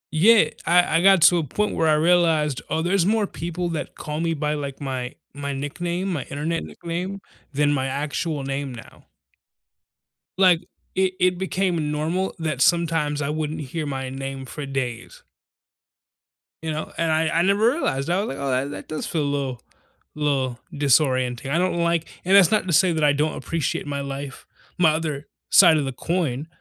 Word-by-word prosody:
Yeah. 195 Hz, 0 st, +6 dB, 0.2 s
I 175 Hz, -1 st, +4 dB
I -, -, +2 dB
got 190 Hz, -3 st, +6 dB
to 175 Hz, -, +7 dB
a -, -, -1 dB
point 210 Hz, +9 st, -1 dB
where 160 Hz, -, +1 dB
I 155 Hz, -, +4 dB
realized, 160 Hz, -4 st, +2 dB
oh, 160 Hz, -, 0 dB
there's 185 Hz, +1 st, +2 dB
more 215 Hz, +3 st, +2 dB
people 175 Hz, -1 st, -4 dB
that 160 Hz, -, -5 dB
call 150 Hz, +1 st, -5 dB
me 165 Hz, -1 st, 0 dB
by, 150 Hz, 0 st, -1 dB
like, 140 Hz, -2 st, -5 dB
my 130 Hz, -3 st, -4 dB, 0.2 s
my 140 Hz, 0 st, -4 dB
nickname, 175 Hz, +7 st, -3 dB
my 145 Hz, -, -2 dB
Internet 155 Hz, +4 st, -3 dB
nickname 180 Hz, +4 st, -5 dB, 0.3 s
than 145 Hz, +1 st, +2 dB
my 135 Hz, -1 st, 0 dB
actual 145 Hz, +2 st, -2 dB
name 135 Hz, 0 st, -3 dB
now. 115 Hz, -, -14 dB, 1.3 s
Like 180 Hz, -3 st, +5 dB, 0.3 s
it 190 Hz, 0 st, +2 dB
it 180 Hz, 0 st, +2 dB
became 180 Hz, -5 st, -1 dB
normal 165 Hz, +6 st, -1 dB
that 155 Hz, -5 st, -2 dB
sometimes 165 Hz, -3 st, +2 dB
I 140 Hz, -, -1 dB
wouldn't 155 Hz, 0 st, -3 dB
hear 150 Hz, +3 st, -4 dB
my 135 Hz, -2 st, -4 dB
name 135 Hz, 0 st, -6 dB
for 145 Hz, +3 st, -7 dB
days. 125 Hz, -3 st, -5 dB, 1.4 s
You 160 Hz, -, -2 dB
know? 155 Hz, 0 st, -4 dB
And 165 Hz, -1 st, +1 dB
I 160 Hz, +1 st, +2 dB
I 165 Hz, -, +1 dB
never 200 Hz, +5 st, +3 dB
realized. 165 Hz, -, -1 dB
I 180 Hz, +2 st, +2 dB
was -, -, -4 dB
like, 135 Hz, -, -5 dB
"Oh, 135 Hz, 0 st, -1 dB
that -, -, -8 dB
does 155 Hz, -, -4 dB
feel 155 Hz, -3 st, -1 dB
a 145 Hz, 0 st, 0 dB
li'l 130 Hz, -4 st, -4 dB, 0.5 s
li'l 135 Hz, -5 st, 0 dB, 0.2 s
disorienting. 135 Hz, -2 st, +1 dB
I 160 Hz, -, +2 dB
don't 185 Hz, -1 st, +1 dB
like" 170 Hz, -1 st, 0 dB, 0.2 s
and 190 Hz, +2 st, +4 dB
that's 180 Hz, -4 st, +6 dB
not 215 Hz, -3 st, +2 dB
to 175 Hz, -, -1 dB
say 175 Hz, +3 st, +4 dB
that 160 Hz, -1 st, -1 dB
I 145 Hz, -, +5 dB
don't 150 Hz, +2 st, 0 dB
appreciate 165 Hz, -4 st, -2 dB
my 140 Hz, -1 st, -3 dB
life, 140 Hz, 0 st, -6 dB, 0.3 s
my 165 Hz, -3 st, +5 dB
other 155 Hz, -2 st, -3 dB, 0.2 s
side 175 Hz, -5 st, +7 dB
of 150 Hz, -, 0 dB
the 135 Hz, -, -2 dB
coin. 160 Hz, -2 st, -2 dB
155 Hz, 185 wpm, -23 LUFS, 140-175 Hz, 1.4 s, to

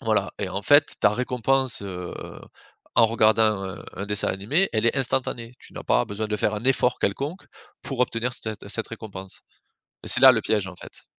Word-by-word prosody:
Voilà -, -, 0 dB
et -, -, -2 dB
en 100 Hz, +2 st, -4 dB
fait 145 Hz, +4 st, +4 dB
ta -, -, +5 dB
récompense, 125 Hz, +2 st, 0 dB
heu, 90 Hz, -3 st, -6 dB, 0.8 s
en 115 Hz, -, +7 dB
regardant 110 Hz, -1 st, +3 dB, 0.2 s
un 95 Hz, +1 st, -7 dB
un 100 Hz, -, -6 dB
dessin 105 Hz, 0 st, 0 dB
animé 145 Hz, -, 0 dB
elle 110 Hz, +1 st, +1 dB
est 115 Hz, -, +2 dB
instantanée. 125 Hz, -2 st, -1 dB
Tu -, -, -14 dB
n'as -, -, -8 dB
pas -, -, +2 dB
besoin 110 Hz, -1 st, -4 dB
de 105 Hz, 0 st, -2 dB
faire 105 Hz, 0 st, 0 dB
un 105 Hz, +2 st, -6 dB
effort 125 Hz, -1 st, +1 dB
quelconque 140 Hz, -, -3 dB, 0.4 s
pour 135 Hz, -3 st, -5 dB
obtenir 125 Hz, 0 st, 0 dB
cet 110 Hz, -4 st, -5 dB
cette 110 Hz, +2 st, -1 dB
récompense 100 Hz, -4 st, -9 dB, 0.6 s
et -, -, -8 dB
c'est 125 Hz, -, +7 dB
là 135 Hz, -1 st, +10 dB
le 115 Hz, -3 st, 0 dB
piège 105 Hz, -3 st, 0 dB
en 95 Hz, -, -9 dB
fait. -, -, -12 dB
115 Hz, 200 wpm, -24 LUFS, 105-125 Hz, 0.8 s, là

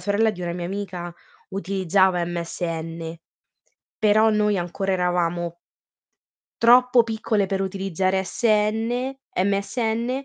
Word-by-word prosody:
sorella 205 Hz, +4 st, +2 dB
di 180 Hz, -4 st, -8 dB
una 170 Hz, 0 st, -2 dB
mia 175 Hz, 0 st, -4 dB
amica 180 Hz, -3 st, -5 dB, 0.4 s
utilizzava 190 Hz, -1 st, +1 dB
MSN, 165 Hz, -1 st, -4 dB, 0.8 s
però 215 Hz, 0 st, +4 dB
noi 210 Hz, -2 st, +2 dB
ancora 190 Hz, +3 st, -2 dB
eravamo 175 Hz, -1 st, 0 dB, 1.1 s
troppo 245 Hz, +1 st, +6 dB
piccole 220 Hz, -2 st, -1 dB
per 195 Hz, 0 st, -2 dB
utilizzare 190 Hz, 0 st, -1 dB
SN 225 Hz, +5 st, 0 dB, 0.3 s
MSN, 220 Hz, +4 st, -1 dB
195 Hz, 100 wpm, -23 LUFS, 175-215 Hz, 1.1 s, troppo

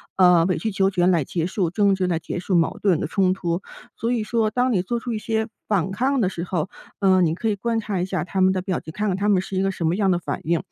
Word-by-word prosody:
呃， 180 Hz, -3 st, +5 dB
委 185 Hz, 0 st, 0 dB
曲 220 Hz, +6 st, -2 dB
求 195 Hz, 0 st, +1 dB
全 180 Hz, -1 st, +2 dB
来 170 Hz, -5 st, +3 dB
结 165 Hz, +4 st, -2 dB
束 185 Hz, -3 st, -1 dB
争 200 Hz, 0 st, +3 dB
执， 190 Hz, -1 st, -1 dB
来 175 Hz, -3 st, 0 dB
结 170 Hz, -, -5 dB
束 185 Hz, +1 st, -1 dB
矛 165 Hz, -1 st, +2 dB
盾 185 Hz, -6 st, +3 dB
的 -, -, -2 dB
冲 185 Hz, +2 st, +2 dB
突。 175 Hz, -1 st, -2 dB, 0.3 s
所 230 Hz, -, -2 dB
以 235 Hz, -3 st, 0 dB
说 220 Hz, 0 st, 0 dB
当 250 Hz, +3 st, +1 dB
你 185 Hz, -4 st, +1 dB
做 235 Hz, +5 st, -2 dB
出 240 Hz, +1 st, -5 dB
一 -, -, -1 dB
些 220 Hz, 0 st, -1 dB, 0.2 s
反 195 Hz, -4 st, +1 dB
抗 260 Hz, +6 st, +1 dB
的 190 Hz, -, +2 dB
时 170 Hz, -3 st, -5 dB
候， 175 Hz, -1 st, -2 dB, 0.3 s
呃， 190 Hz, -2 st, +4 dB
你 160 Hz, -2 st, +2 dB
可 225 Hz, +6 st, -2 dB
以 210 Hz, -, 0 dB
观 230 Hz, +3 st, -1 dB
察 210 Hz, -3 st, -3 dB
一 175 Hz, -, 0 dB
下 185 Hz, -1 st, -2 dB
他 190 Hz, +2 st, -4 dB
们 190 Hz, 0 st, +4 dB
的 185 Hz, -, -1 dB
表 185 Hz, -1 st, -2 dB
情， 160 Hz, -, -10 dB
看 210 Hz, +1 st, -1 dB
看 190 Hz, -2 st, 0 dB
他 200 Hz, +1 st, 0 dB
们 195 Hz, -3 st, +4 dB
是 190 Hz, -, -7 dB
一 -, -, +2 dB
个 195 Hz, -, +1 dB
什 175 Hz, -3 st, -4 dB
么 170 Hz, -, +1 dB
样 195 Hz, -1 st, +2 dB
的 175 Hz, -, +1 dB
反 -, -, -4 dB
应。 165 Hz, 0 st, +1 dB
190 Hz, 325 characters per minute, -23 LUFS, 175-210 Hz, 0.3 s, 呃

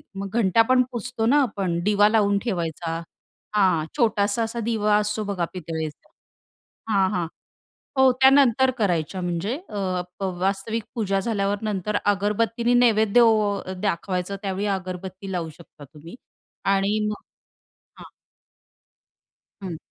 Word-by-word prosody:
मग 195 Hz, 0 st, -5 dB
घंटा 205 Hz, +1 st, +4 dB
पण 255 Hz, 0 st, +5 dB
पुसतो 240 Hz, -1 st, -3 dB
ना 280 Hz, +6 st, +4 dB
आपण, 195 Hz, -9 st, -1 dB
दिवा 205 Hz, +1 st, +4 dB
लावून 205 Hz, -2 st, +3 dB
ठेवायचा, 170 Hz, -6 st, -3 dB, 0.6 s
हां, 185 Hz, -6 st, +3 dB
छोटासा 215 Hz, -1 st, +2 dB
असा 225 Hz, +1 st, -4 dB
दिवा 210 Hz, -2 st, +2 dB
असतो 210 Hz, +1 st, -1 dB
बघा 195 Hz, -4 st, -2 dB
पितळेचा 160 Hz, -3 st, -6 dB, 0.8 s
हां, 190 Hz, -1 st, +3 dB
हां. 180 Hz, -4 st, -1 dB, 0.7 s
हो, 265 Hz, -1 st, +6 dB
त्या 265 Hz, -, +9 dB
नंतर 265 Hz, -1 st, +4 dB
करायच्या 180 Hz, -2 st, 0 dB
म्हणजे 175 Hz, +6 st, -2 dB
अ, 185 Hz, -3 st, -2 dB, 0.2 s
प 195 Hz, -, -4 dB, 0.2 s
वास्तविक 200 Hz, +4 st, -1 dB
पूजा 195 Hz, -4 st, 0 dB
झाल्यावर 205 Hz, -1 st, -1 dB
नंतर 205 Hz, +1 st, -1 dB
अगरबत्तीने 215 Hz, +4 st, +1 dB
नैवेद्य 230 Hz, -2 st, +4 dB
ओ 215 Hz, -3 st, +3 dB, 0.2 s
दाखवायचं, 185 Hz, -1 st, -2 dB
त्यावेळी 200 Hz, 0 st, -2 dB
अगरबत्ती 185 Hz, +1 st, -7 dB
लावू 170 Hz, -3 st, -3 dB
शकता 160 Hz, -3 st, -15 dB
तुम्ही 165 Hz, +7 st, -11 dB, 0.6 s
आणि 200 Hz, +2 st, +1 dB
मग 210 Hz, -, -6 dB, 0.8 s
हां. -, -, -12 dB, 1.5 s
हं. 175 Hz, -4 st, -5 dB
200 Hz, 125 wpm, -24 LUFS, 185-225 Hz, 1.5 s, त्या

